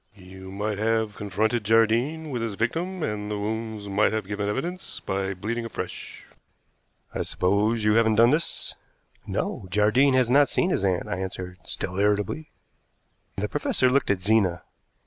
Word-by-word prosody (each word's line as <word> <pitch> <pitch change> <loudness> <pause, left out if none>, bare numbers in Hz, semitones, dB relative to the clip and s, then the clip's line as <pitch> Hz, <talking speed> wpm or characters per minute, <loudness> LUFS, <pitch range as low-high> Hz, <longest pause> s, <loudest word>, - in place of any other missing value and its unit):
You 95 -1 -11
might 100 +1 -3
have 110 -1 +1
confronted 105 +3 0
Jardine 115 +9 +2
with 120 -3 -2
his 115 -3 -3
victim, 165 - -2
and 105 -3 -3
the 105 - -2
wounds 110 0 -4
might 100 +2 +2
have 110 -2 -2
given 105 0 -2
evidence 175 - -4
by 95 0 -2
bleeding 115 +5 -3
afresh. 115 - -6 0.9
I - - -2
suppose 105 +4 +1
you 105 - +4
haven't 110 -1 +4
done 115 +3 +6
this?" 160 +3 -1 0.5
"No, 95 - -3
Jardine 110 +8 +4
has 130 -2 +4
not 140 +3 +5
seen 185 - +1
his 100 - 0
aunt," 95 -2 +1
I 90 - -3
answered, 90 -1 -5
still 90 +2 -4
irritably. 105 +9 0 0.9
The 105 +2 -1
professor 130 -1 +1
looked 140 +2 +2
at 100 - +2
Zena. 95 -3 +2
110 Hz, 160 wpm, -25 LUFS, 100-120 Hz, 0.9 s, done